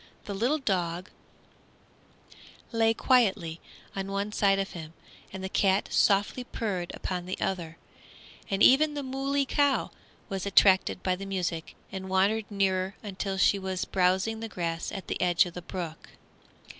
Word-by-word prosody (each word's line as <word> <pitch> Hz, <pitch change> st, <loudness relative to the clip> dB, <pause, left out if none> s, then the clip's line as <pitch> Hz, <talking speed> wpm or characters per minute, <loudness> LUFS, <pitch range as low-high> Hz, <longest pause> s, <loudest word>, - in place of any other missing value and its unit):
The 205 Hz, -, -4 dB
little 240 Hz, +10 st, +1 dB
dog 180 Hz, -, -2 dB, 1.6 s
lay 225 Hz, -1 st, +3 dB
quietly 200 Hz, -10 st, +2 dB, 0.3 s
on 195 Hz, 0 st, -3 dB
one 200 Hz, +1 st, -2 dB
side 200 Hz, -2 st, +3 dB
of 195 Hz, 0 st, -2 dB
him, 160 Hz, -2 st, -8 dB, 0.4 s
and 190 Hz, 0 st, -7 dB
the -, -, -1 dB
cat 195 Hz, +1 st, +1 dB
softly 205 Hz, +5 st, +3 dB
purred 195 Hz, -8 st, -3 dB
upon 180 Hz, -1 st, -4 dB
the 185 Hz, -, -4 dB
other, 170 Hz, -4 st, -3 dB, 0.7 s
and 195 Hz, +1 st, +1 dB
even 295 Hz, +3 st, +6 dB
the 285 Hz, -, -3 dB
moolie 275 Hz, +1 st, -1 dB
cow 285 Hz, 0 st, +1 dB, 0.4 s
was 195 Hz, -1 st, -3 dB
attracted 195 Hz, -1 st, +4 dB
by 185 Hz, -1 st, +1 dB
the 195 Hz, +2 st, -7 dB
music 175 Hz, -4 st, -3 dB, 0.2 s
and 190 Hz, -1 st, -6 dB
wandered 200 Hz, +3 st, +2 dB
near 195 Hz, -1 st, 0 dB
until 195 Hz, -1 st, -3 dB
she 200 Hz, +1 st, +4 dB
was 190 Hz, -1 st, -3 dB
browsing 190 Hz, +4 st, +1 dB
the 225 Hz, 0 st, -5 dB
grass 170 Hz, -3 st, -3 dB
at 195 Hz, -, -6 dB
the -, -, -4 dB
edge 180 Hz, +1 st, +4 dB
of 175 Hz, -, -7 dB
the 180 Hz, -, -6 dB
brook. 170 Hz, -2 st, -6 dB
195 Hz, 155 wpm, -28 LUFS, 185-215 Hz, 1.6 s, even